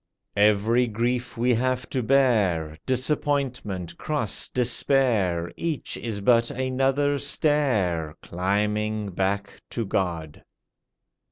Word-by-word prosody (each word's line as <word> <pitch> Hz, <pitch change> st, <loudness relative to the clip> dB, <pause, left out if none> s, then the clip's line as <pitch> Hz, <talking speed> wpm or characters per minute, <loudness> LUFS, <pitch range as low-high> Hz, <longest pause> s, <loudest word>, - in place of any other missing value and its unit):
Every 105 Hz, +4 st, +3 dB
grief 120 Hz, +3 st, -2 dB
we 125 Hz, +2 st, +2 dB
have 130 Hz, +1 st, 0 dB
to 130 Hz, -, 0 dB
bear 110 Hz, -, +2 dB
Disappointment, 130 Hz, -, -1 dB
cross, 145 Hz, -9 st, -1 dB
despair 120 Hz, -8 st, +1 dB
Each 165 Hz, -4 st, -3 dB
is 110 Hz, -4 st, -4 dB
but 115 Hz, +2 st, +4 dB
another 135 Hz, +2 st, 0 dB
stair 105 Hz, -, +1 dB
Climbing 105 Hz, +3 st, -1 dB
back 100 Hz, +2 st, -2 dB
to 115 Hz, -, -3 dB
God. 85 Hz, -6 st, -2 dB
115 Hz, 95 wpm, -25 LUFS, 100-130 Hz, -, but